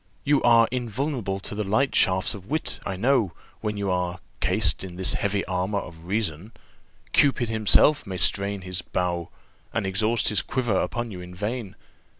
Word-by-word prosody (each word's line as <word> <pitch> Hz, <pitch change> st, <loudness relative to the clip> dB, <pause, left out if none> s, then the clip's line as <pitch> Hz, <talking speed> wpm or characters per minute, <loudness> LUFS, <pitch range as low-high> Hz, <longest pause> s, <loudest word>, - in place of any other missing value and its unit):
You 145 Hz, -1 st, +3 dB
are 115 Hz, -1 st, +6 dB
invulnerable 120 Hz, -4 st, -2 dB
to -, -, -6 dB
the 105 Hz, +1 st, -2 dB
light 110 Hz, +8 st, +1 dB
shafts 95 Hz, -2 st, +3 dB
of 100 Hz, -2 st, -10 dB
wit, 155 Hz, +6 st, -2 dB
I 95 Hz, -, -2 dB
know, 115 Hz, -2 st, +2 dB, 0.3 s
when 105 Hz, -1 st, -3 dB
you 100 Hz, -2 st, -1 dB
are 90 Hz, 0 st, -1 dB, 0.2 s
cased 95 Hz, -2 st, +2 dB
in 90 Hz, -2 st, -7 dB
this 95 Hz, +1 st, +2 dB
heavy 100 Hz, -1 st, -1 dB
armour 95 Hz, +2 st, -1 dB
of 85 Hz, -3 st, -7 dB
reason; 100 Hz, 0 st, -2 dB, 0.6 s
Cupid 130 Hz, -5 st, +3 dB
himself 110 Hz, +6 st, +4 dB
may 95 Hz, -1 st, -4 dB
strain 100 Hz, +2 st, +1 dB
his 90 Hz, -1 st, -4 dB
bow, 85 Hz, -1 st, -2 dB, 0.4 s
and 110 Hz, -, -1 dB
exhaust 110 Hz, +4 st, +1 dB
his 105 Hz, -3 st, +3 dB
quiver 120 Hz, -7 st, -1 dB
upon 120 Hz, -1 st, -2 dB
you 90 Hz, -2 st, -7 dB
in 90 Hz, 0 st, -10 dB
vain. 105 Hz, +1 st, -4 dB
100 Hz, 170 wpm, -25 LUFS, 95-115 Hz, 0.6 s, are